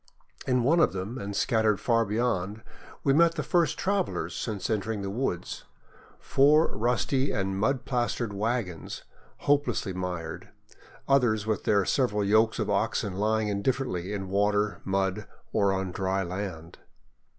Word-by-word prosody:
In 125 -2 +2
one 160 +7 +4
of 155 - +4
them, 100 +7 -4
and 100 -2 -5
scattered 110 -4 +2
far 115 -1 +2
beyond, 105 -1 -1 0.4
we 135 - +3
met 165 +2 +4
the - - -2
first 175 -3 +1
travelers 195 -1 -1
since 105 -4 -3
entering 110 -1 -2
the 95 - -3
woods, 105 -6 -3 0.3
— - - -26 0.2
four 150 +4 +3
rusty 125 +4 +1
and 95 -1 -1
mud 125 +5 0
plastered 120 -3 -1
wagons, 105 -5 -3 0.4
hopelessly 145 -8 +1
mired, 90 -3 -5 0.6
others 120 -6 +3
with 110 -1 -1
their 100 -2 +3
several 105 -6 +1
yokes 110 +2 +3
of - - -1
oxen 100 - 0
lying 110 +2 +1
indifferently 100 -3 -1
in 100 -2 -4
water, 105 +2 +1
mud, 95 +1 -1 0.3
or 100 -2 +3
on 95 -1 -2
dry 95 +1 -1
land. 90 -2 -6
105 Hz, 145 wpm, -27 LUFS, 95-125 Hz, 0.6 s, one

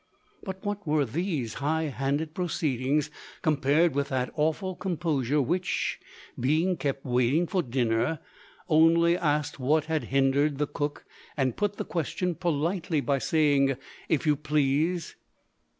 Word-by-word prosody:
But 190 +1 -7
what 205 -3 -3
were 150 -1 +2
these 145 - -2
highhanded 150 0 -1
proceedings, 150 -4 -1 0.3
compared 150 +2 +3
with 140 0 -1
the 130 -2 -1
awful 160 +5 -1
composure 150 -7 0
which, 175 +7 -1 0.4
being 155 +9 +2
kept 140 -4 -3
waiting 125 +6 +2
for 185 +1 0
dinner, 120 +1 0 0.5
only 165 +1 +5
asked 150 -3 -1
what 150 +4 +2
had 160 -1 -1
hindered 135 +2 +2
the 150 - +1
cook, 145 0 -4 0.3
and 130 -3 +1
put 205 -1 -1
the - - -3
question 180 +2 -2
politely, 165 0 -1
by 140 -1 0
saying, 140 -3 +2 0.3
"if 160 - +1
you 150 -1 +4
please"? 150 +3 0
150 Hz, 130 wpm, -27 LUFS, 140-170 Hz, 0.5 s, only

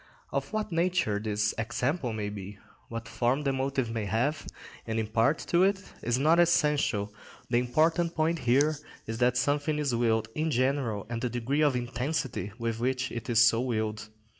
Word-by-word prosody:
Of - - -2
what 215 -2 -2
nature 170 - +1
this 105 0 0
example 125 +5 -1
may 105 -2 -3
be, 100 0 -8 0.3
what 115 0 -5
form 125 +4 0
the 135 -1 +1
motive 130 -2 -1
may 115 -2 -2
have 120 +9 -1 0.4
and 110 0 -2
impart 115 +7 +2
to 175 - +4
it, 195 +1 +1
is 120 +1 0
not 155 +5 +4
essential; 150 -11 +2 0.4
the 120 - +4
important 160 +7 +1
point 160 +1 +1
here 140 +6 +3 0.3
is 115 +1 -5
that 125 0 +3
something 145 +4 +1
is 145 -4 0
willed 115 -2 +1
in 155 +1 -1
general 130 -6 0
and 115 0 -4
the 125 - -1
degree 125 +5 -1
of 145 -4 +3
intensity 125 - -2
with 115 -2 -2
which 130 +1 -1
it 120 +2 -6
is 115 0 +6
so 115 0 +3
willed. 110 -3 -2
125 Hz, 175 wpm, -29 LUFS, 115-150 Hz, 0.4 s, is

